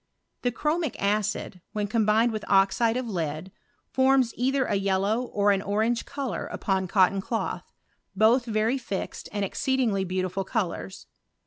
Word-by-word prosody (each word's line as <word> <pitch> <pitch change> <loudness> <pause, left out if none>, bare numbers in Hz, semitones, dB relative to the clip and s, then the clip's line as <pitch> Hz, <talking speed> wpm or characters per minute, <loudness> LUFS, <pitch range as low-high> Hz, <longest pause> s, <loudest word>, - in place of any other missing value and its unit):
The 245 - +1
chromic 305 +4 -1
acid, 205 -2 -1
when 210 -1 -1
combined 220 +2 +2
with 215 -1 -4
oxide 200 +4 +3
of 255 -1 -3
lead, 165 -2 -3 0.4
fonns 265 -2 +3
either 265 +2 +1
a - - -1
yellow 200 +3 +1
or 205 -3 +2
an 195 -1 +1
orange 220 +4 0
colour 280 -3 -4
upon 190 -2 -1
cotton 195 +1 +3
cloth, 225 +3 -3 0.4
both 225 +5 +4
very 225 +3 0
fixed 195 -5 -5
and 205 -1 -1
exceedingly 235 -2 0
beautiful 185 +1 -2
colours. 170 - -3
210 Hz, 140 wpm, -26 LUFS, 195-240 Hz, 0.4 s, both